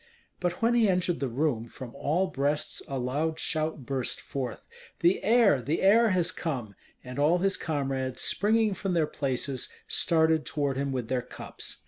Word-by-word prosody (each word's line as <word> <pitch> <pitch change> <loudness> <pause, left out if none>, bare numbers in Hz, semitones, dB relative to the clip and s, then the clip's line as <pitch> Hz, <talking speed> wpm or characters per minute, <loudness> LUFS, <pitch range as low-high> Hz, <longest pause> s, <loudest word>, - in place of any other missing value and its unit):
But 180 +4 -2
when 235 +1 +4
he 230 -3 +4
entered 180 -2 +1
the 140 - -1
room, 125 -2 -1
from 120 0 -9
all 160 +7 0
breasts 145 -3 -1
a 135 - -3
loud 145 +6 -1
shout 155 -3 -2
burst 130 -2 -2
forth: 130 -3 -5 0.4
"The 175 +2 +3
heir, 215 - +5
the 150 +9 -1
heir 225 +4 +6
has 180 -3 +2
come!" 130 - -4 0.3
and 125 +2 -7
all 155 +5 +4
his 195 +2 +1
comrades, 135 -4 -2
springing 215 0 +2
from 190 -1 -2
their 160 -2 +3
places, 135 -2 -2 0.2
started 160 -2 +2
toward 145 -3 -1
him 140 0 -1
with 125 -4 -3
their 125 +1 0
cups. 125 - -7
150 Hz, 170 wpm, -28 LUFS, 130-180 Hz, 0.4 s, heir